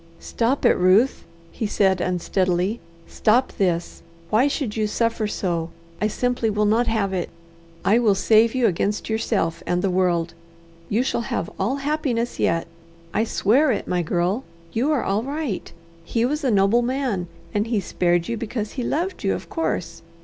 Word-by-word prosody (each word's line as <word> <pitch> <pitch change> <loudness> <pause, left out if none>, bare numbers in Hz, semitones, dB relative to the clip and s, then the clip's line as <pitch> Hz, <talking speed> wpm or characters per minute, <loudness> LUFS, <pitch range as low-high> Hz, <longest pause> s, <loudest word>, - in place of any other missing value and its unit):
"Stop 245 +4 -1
it, - - +7
Ruth!" 190 +8 +3 0.3
he 220 - -3
said 190 -3 +2
unsteadily. 185 +3 0 0.3
"Stop 240 +5 +2
this! 175 -3 0 0.3
Why 230 +6 +4
should 275 -6 -2
you 215 -1 0
suffer 225 0 0
so? 170 -5 -2 0.3
I 210 - +3
simply 245 +1 0
will 210 0 +1
not 225 +3 +2
have 210 -4 0
it. 180 -2 -2 0.6
I 220 +4 +5
will 215 -5 +3
save 225 +4 +4
you 255 -2 +2
against 205 +3 0
yourself 195 -7 0
and 175 +1 0
the 195 - +1
world. 175 -2 +1 0.6
You 225 +5 +2
shall 260 - -1
have - - -2
all 210 +8 +1
happiness 275 -5 -1
yet; 165 0 +1 0.5
I 220 - +2
swear 255 +7 +3
it, 215 - -2
my 180 -1 0
girl! 175 +8 0 0.3
You 260 +7 +1
are 295 - +1
all 200 +2 0
right. 280 -4 -4 0.3
He 230 +7 0
was 300 +4 -1
a 265 - +2
noble 205 +2 +4
man, 240 -7 -1 0.3
and 210 +2 0
he 225 -2 +1
spared 175 -2 0
you 235 - -2
because 220 -1 -4
he 250 - -4
loved 350 +9 -2
you, - - +1
of - - -8
course. 170 - -2
215 Hz, 170 wpm, -23 LUFS, 185-245 Hz, 0.6 s, it